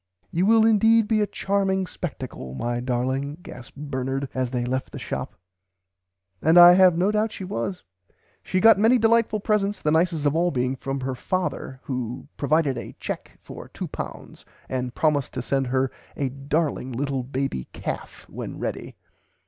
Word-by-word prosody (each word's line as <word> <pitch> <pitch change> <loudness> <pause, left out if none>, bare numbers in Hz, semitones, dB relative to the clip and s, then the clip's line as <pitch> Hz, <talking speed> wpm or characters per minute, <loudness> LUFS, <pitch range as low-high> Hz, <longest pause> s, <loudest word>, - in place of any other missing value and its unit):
"You 180 +4 +1
will 225 0 +6
indeed 225 0 +4
be 215 -1 +2
a 210 - +1
charming 195 -1 0
spectacle 130 - -6
my 120 - -2
darling 130 +4 -1
gasped 130 +2 -11
Bernard 135 -1 -3
as 130 -1 -1
they 120 -1 -2
left 130 +1 -2
the - - -7
shop," - - -5 1.1
and 160 +3 +4
I 175 0 +11
have 180 -2 +6
no 185 +4 +2
doubt 215 +1 +1
she - - -7
was. 180 +1 -4 0.6
She 185 - -1
got 225 0 +7
many 225 +4 +5
delightful 225 -1 +3
presents, 205 0 0
the 150 - 0
nicest 160 -1 +2
of 145 +1 +2
all 175 +2 +3
being 130 -3 -1
from 135 +1 -4
her 130 0 -2
father, 130 -3 -3
who 125 0 -4
"provided 145 -3 +1
a - - -9
cheque - - -6
for - - -10
£2 - - -7 0.2
and 125 -1 -3
promised 150 -4 +1
to 125 - -2
send 135 0 0
her 130 +1 +1 0.3
a 140 -2 0
darling 140 0 -2
little 135 +1 -1
baby 130 - -3
calf - - -6
when - - -7
ready." - - -5
145 Hz, 165 wpm, -24 LUFS, 130-190 Hz, 1.1 s, I